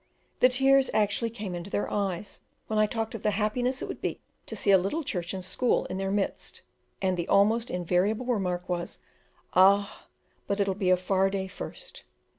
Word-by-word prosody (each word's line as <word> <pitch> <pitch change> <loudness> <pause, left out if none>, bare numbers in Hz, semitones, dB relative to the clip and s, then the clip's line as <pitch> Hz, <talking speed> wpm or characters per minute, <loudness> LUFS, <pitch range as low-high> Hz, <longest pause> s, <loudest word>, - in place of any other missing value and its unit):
The 255 - +6
tears 270 +1 +4
actually 215 +2 +1
came 210 -5 -6
into 175 +2 -6
their 205 - -1
eyes 200 -1 -2 0.3
when 215 -1 -1
I 215 - +4
talked 225 0 -3
of 225 - -6
the - - +1
happiness 245 +4 0
it - - -4
would - - -7
be - - -3 0.3
to - - -5
see 200 - +2
a 195 - +8
little 200 - -2
church 175 -9 -3
and 185 -1 -5
school 245 +6 +1
in 185 - -3
their 195 0 -1
midst; 200 0 -3 0.4
and 185 -1 +1
the 170 - -2
almost 220 +4 +3
invariable 180 +7 0
remark 185 -7 -1
was, 175 -1 -3 0.6
"Ah, 200 +2 +4 0.4
but 200 0 -1
it'll 195 -1 +1
be 190 -1 -1
a 185 - +5
far 190 +1 +1
day 195 -1 -3
first." - - -9
200 Hz, 195 wpm, -28 LUFS, 185-225 Hz, 0.6 s, a